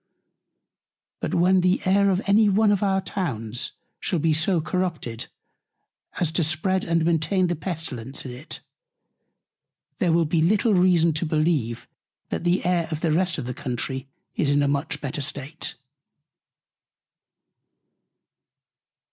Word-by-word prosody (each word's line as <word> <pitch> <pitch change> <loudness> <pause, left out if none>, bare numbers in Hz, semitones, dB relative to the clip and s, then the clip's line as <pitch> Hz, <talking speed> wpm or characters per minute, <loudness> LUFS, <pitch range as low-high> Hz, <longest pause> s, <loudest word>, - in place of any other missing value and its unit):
But - - -2
when 185 +2 +4
the 180 +1 +2
Air 200 +1 +4
of 190 +1 +1
any 210 +1 +5
one 205 +2 +4
of 200 - +1
our 195 -1 +2
Towns 125 - -3 0.3
shall 180 - -1
be 160 0 +2
so 165 +3 +2
corrupted, 160 -9 -3 0.9
as 170 -3 +1
to 165 +1 +1
spread 185 +5 0
and 165 -1 +1
maintain 170 +3 +2
the 175 0 0
Pestilence 150 -6 -4
in 130 - -5
it, 125 +6 -7 1.4
there 180 -6 +2
will 165 0 +3
be 160 +1 +1
little 210 +6 +3
reason 180 -3 +4
to 155 +3 -2
believe, 155 -7 0 0.4
that - - -3
the 175 +1 +1
Air 175 -2 +1
of 155 -2 -4
the 165 - +1
rest 175 +1 +1
of 140 - -4
the 125 - -3
Country 130 +2 -3 0.3
is 145 - 0
in 145 0 +3
a - - +2
much 145 +1 -1
better 145 0 -3
State. 145 +2 -3
165 Hz, 140 wpm, -24 LUFS, 145-185 Hz, 1.4 s, any